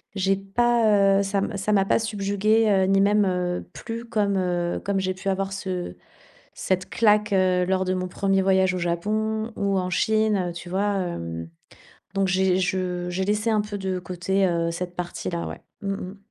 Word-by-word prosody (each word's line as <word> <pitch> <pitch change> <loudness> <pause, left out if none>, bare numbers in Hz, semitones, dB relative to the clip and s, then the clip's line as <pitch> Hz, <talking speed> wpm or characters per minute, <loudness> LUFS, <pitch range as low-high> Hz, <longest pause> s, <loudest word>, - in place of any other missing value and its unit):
J'ai 195 0 +2
pas, 205 -1 +3
heu, - - +2
ça 200 +1 -1
m 200 - -2
ça 195 +2 -1
m'a 195 -1 +3
pas - - +3
subjuguée, 215 +1 +1
heu, 195 -2 +4
ni 195 +1 +3
même, 205 +1 +4
heu, 180 -1 -1
plu 230 0 -6
comme, 210 -4 0
heu, 175 -2 -1
comme 200 -1 0
j'ai 185 0 -1
pu 190 +1 -4
avoir 195 0 -1
ce 185 -2 -4 0.6
cette 185 0 -2
claque, 210 -2 +3
heu, 185 -1 +3
lors 190 +1 +1
de 185 - 0
mon 185 0 -2
1er 195 +1 +1
voyage 190 -1 +3
au - - -2
Japon 215 +6 -1
ou 200 -1 +1
en 180 -1 -1
Chine, 215 +2 +2
heu, - - -9
tu 175 +1 -8
vois, 200 +3 0
hem? 85 - -4 0.6
Donc 195 -1 +1
j'ai 185 0 +2
je 180 -1 -1
j'ai 185 +2 -1
laissé 210 +3 0
un 215 -1 +3
peu 205 0 -5
de 190 -1 -2
côté, 180 +2 0
heu, 170 -2 0
cette 175 +1 -5
partie 175 0 -4
là, 170 -1 -3
ouais, - - -7 0.2
mmh 195 - -2
mh. 195 0 -7
195 Hz, 200 wpm, -24 LUFS, 180-205 Hz, 0.6 s, heu